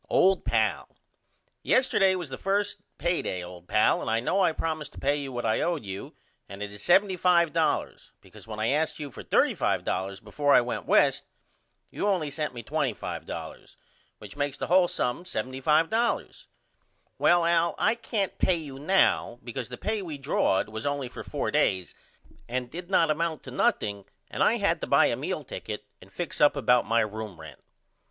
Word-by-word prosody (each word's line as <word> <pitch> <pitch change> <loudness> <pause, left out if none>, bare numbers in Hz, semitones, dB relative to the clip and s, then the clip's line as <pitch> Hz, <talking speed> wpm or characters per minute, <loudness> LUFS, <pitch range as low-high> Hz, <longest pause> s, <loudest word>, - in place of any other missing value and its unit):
OLD 190 0 +4
PAL: - - 0 0.7
Yesterday 195 -7 +3
was 175 -5 -5
the 130 - -6
1st 200 +1 0 0.2
pay 175 0 0
day 90 -1 -4
old 90 0 -11
pal 105 - +3
and - - -3
I 115 +1 +2
know 185 +11 +1
I 175 - +4
promised 155 -1 -4
to - - -15
pay 140 +1 +1
you 140 -2 -5
what 120 -1 -4
I 110 - +1
owe 175 0 +1
you 100 -9 -7 0.3
and 100 +1 -6
it 100 - -6
is 105 - -10
$75.00 175 -4 +2
because - - -16
when 110 -1 -6
I 110 - +1
asked 155 +3 0
you 145 -3 -6
for - - -9
$35.00 95 +1 0
before 145 -1 +2
I - - +8
went 120 0 -4
West - - +3 0.7
you 205 - -2
only 175 -8 0
sent 150 -2 -3
me 120 - -6
$25.00 - - -4 0.4
which 105 -1 -11
makes 145 -1 -2
the - - -3
hole 180 0 +4
sum 125 0 -2
$75.00. 155 - 0 0.7
Well 175 -1 +4
Al 170 0 +2
I 220 - +3
can't 225 -4 -3
pay 185 - +3
you 145 -5 -7
now 155 -6 +2
because 125 0 -5
the 125 - -7
pay 215 -1 -2
we 160 -6 -6
drawed 135 -9 +1
was 110 +5 -5
only 140 -3 -2
for - - -8
4 - - -3
days 95 -2 +1 0.6
and 125 0 -3
did 175 +2 -7
not 165 -5 +3
amount 160 0 -2
to 130 - -9
nothing 100 -5 0 0.3
and - - -4
I - - +4
had - - +1
to - - -3
buy - - +5
a - - +1
meal - - -3
ticket 105 -1 -7 0.2
and 95 - -16
fix 175 - -5
up 145 - +6
about 125 -3 +3
my 115 +1 +3
room 110 -4 -5
rent. 80 -1 -11
145 Hz, 185 wpm, -27 LUFS, 115-175 Hz, 0.7 s, I